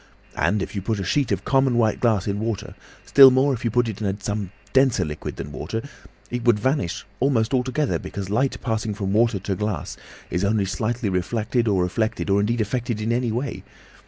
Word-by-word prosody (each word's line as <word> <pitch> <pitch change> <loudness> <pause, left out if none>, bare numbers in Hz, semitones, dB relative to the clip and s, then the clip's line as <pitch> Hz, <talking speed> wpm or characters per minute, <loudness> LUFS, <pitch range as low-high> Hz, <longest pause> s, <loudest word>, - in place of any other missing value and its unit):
And 105 -1 +1
if - - -7
you 100 - -3
put 110 +2 -2
a - - -2
sheet 140 +6 0
of - - -1
common 135 -3 +3
white 110 -2 +2
glass 110 -6 +2
in 100 0 -1
water, 110 -2 -3 0.3
still 135 -1 +9
more 130 +2 +3
if 120 - -5
you 115 - +1
put 120 +1 +2
it 110 -1 -5
in 100 -1 -1
some 105 -1 -3 0.2
denser 130 -8 +3
liquid 75 -1 -6
than 75 - -7
water, 110 - -4 0.5
it 120 -1 -3
would 120 -3 +4
vanish 120 - -1
almost 125 -3 +1
altogether, 130 +3 0
because 100 -1 -6
light 120 +7 0
passing 110 -3 -2
from 100 -1 -2
water 115 0 +3
to 95 +1 -3
glass 105 0 -3 0.3
is 90 - 0
only 100 0 +2
slightly 110 +4 -2
refracted 110 +5 -1
or 95 -4 +2
reflected 105 +2 -1
or 100 - +4
indeed 115 +3 +1
affected 115 +1 -2
in 110 +2 -1
any 120 -1 0
way. 125 +5 -3
110 Hz, 205 wpm, -23 LUFS, 100-120 Hz, 0.5 s, still